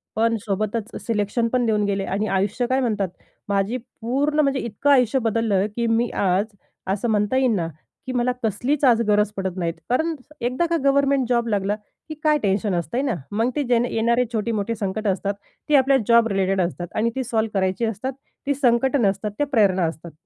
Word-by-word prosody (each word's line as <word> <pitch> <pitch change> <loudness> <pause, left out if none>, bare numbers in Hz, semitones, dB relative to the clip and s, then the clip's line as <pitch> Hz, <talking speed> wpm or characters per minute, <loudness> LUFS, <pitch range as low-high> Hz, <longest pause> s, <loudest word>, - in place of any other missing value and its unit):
पण 230 +1 +2
सोबतच 215 +2 -2
सिलेक्शन 225 +1 0
पण 250 -1 +2
देऊन 215 -2 +1
गेले 200 -1 -1
आणि 205 +3 -1
आयुष्य 195 +5 0
काय 260 +1 +1
म्हणतात? 210 -6 0 0.4
माझी 200 +4 0
पूर्ण 255 +5 -2
म्हणजे 275 -2 +1
इतकं 235 +5 -2
आयुष्य 255 -1 +4
बदललं 220 -3 +1
की 235 -1 0
मी 230 +1 +2
आज 190 +1 +1 0.5
असं 230 +4 -2
म्हणता 210 +4 +1
येईन 255 -4 +3
ना 170 -4 -1 0.4
की - - -2
मला 250 0 +1
कसलीच 245 +8 0
आज 235 -3 +5
गरज 210 0 +3
पडत 190 -1 -3
नाहीत. 170 -2 -1 0.2
कारण 315 +7 +1 0.3
एकदा 250 +8 0
का 335 - +2
गव्हर्नमेंट 275 -2 +3
जॉब 235 -1 +1
लागला 205 -1 0 0.3
की 310 - -5
काय 305 -1 +4
टेन्शन 200 0 +1
असतंय 175 +9 -1
ना. 270 -6 0 0.2
मग 225 +4 +1
ते 295 - +1
जे 245 -2 +2 0.2
येणारे 235 +2 +2
छोटी-मोठे 220 0 -1
संकटं 210 0 -1
असतात 200 +2 -2 0.4
ती 300 - +5
आपल्या 270 0 +5
जॉब 235 -1 +5
रिलेटेड 195 -2 +1
असतात 175 0 -3
आणि 220 +2 +2
ती 265 - -1
सॉल्व्ह 220 -4 -1
करायची 190 +4 0
असतात 225 +5 -3 0.3
ती 285 - +3
संकटं 265 +1 +2
नसतात, 200 0 0
त्या 290 - +1
प्रेरणा 200 -9 +3
असतात. 165 +1 -5
225 Hz, 190 wpm, -22 LUFS, 200-250 Hz, 0.5 s, आज